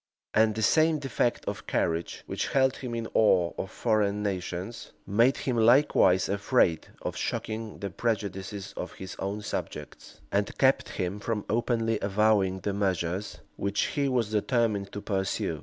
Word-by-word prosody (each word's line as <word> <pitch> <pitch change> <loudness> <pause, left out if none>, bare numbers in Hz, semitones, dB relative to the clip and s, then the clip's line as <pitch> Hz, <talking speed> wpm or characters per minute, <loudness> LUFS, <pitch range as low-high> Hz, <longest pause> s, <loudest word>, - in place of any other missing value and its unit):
And 110 0 +4
the 110 - -1
same 155 +6 +4
defect 135 -4 -1
of - - -5
courage 85 0 -1
which - - -2
held 130 -1 +2
him 125 -3 -5
in 115 -1 -3
awe 90 -5 +4
of 95 - -4
foreign 105 -3 0
nations, 95 +2 -4
made 115 +6 +3
him 125 - -1
likewise 115 -6 +5
afraid 100 -4 +2 0.2
of - - -3
shocking 110 0 -3
the 100 -2 -5
prejudices 100 -2 -3
of - - -5
his 95 - -8
own 100 +2 -3
subjects, - - -6
and 100 0 0
kept 135 0 +3
him 95 +1 -3
from 105 0 -2
openly 115 -1 0
avowing 100 -2 +2
the 100 +2 -2
measures 95 -3 -2 0.2
which 100 +1 0
he 140 -1 +1
was 120 -5 0
determined 105 -2 +1
to 105 - -5
pursue. 95 -2 -1
105 Hz, 155 wpm, -28 LUFS, 95-115 Hz, 0.2 s, likewise